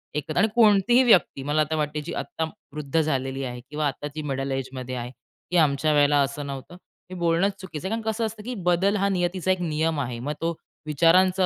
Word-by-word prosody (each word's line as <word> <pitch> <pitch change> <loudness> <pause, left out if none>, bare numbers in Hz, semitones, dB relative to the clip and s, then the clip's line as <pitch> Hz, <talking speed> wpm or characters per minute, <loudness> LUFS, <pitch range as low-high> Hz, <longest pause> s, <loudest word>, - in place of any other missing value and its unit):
एकतर 150 +2 -3
आणि 220 +5 +5
कोणतीही 230 +3 +5
व्यक्ती 175 - +4
मला 150 +2 +1
आता 155 +1 -1
वाटते, 150 0 -2
जी 155 - -6
आता 160 - -4 0.3
वृद्ध 150 +1 -1
झालेली 135 -2 -2
आहे 125 -1 -5
किंवा 150 0 -1
आता 145 +2 -4
जी 155 - -3
मिडल 135 0 -2
एजमध्ये 130 -1 -4
आहे, 120 0 -5 0.4
की 180 - +2
"आमच्या 150 0 +3
वेळेला 145 0 +4
असं 140 +1 -2
नव्हतं." 140 +6 -7 0.4
हे - - -5
बोलणंच 170 +4 +2
चुकीचं 185 -2 -6
आहे, - - -4
कारण 230 - -4
कसं 225 +1 -1
असतं 215 -1 -6
की 250 +1 -5
बदल 185 +4 +3
हा 200 0 +1
नियतीचा 185 0 0
एक 185 -1 0
नियम 160 -1 0
आहे. 120 -3 -3
मग 145 +5 -3
तो 165 0 -1 0.3
विचारांचा 180 +5 +4
155 Hz, 210 wpm, -25 LUFS, 140-185 Hz, 0.4 s, आणि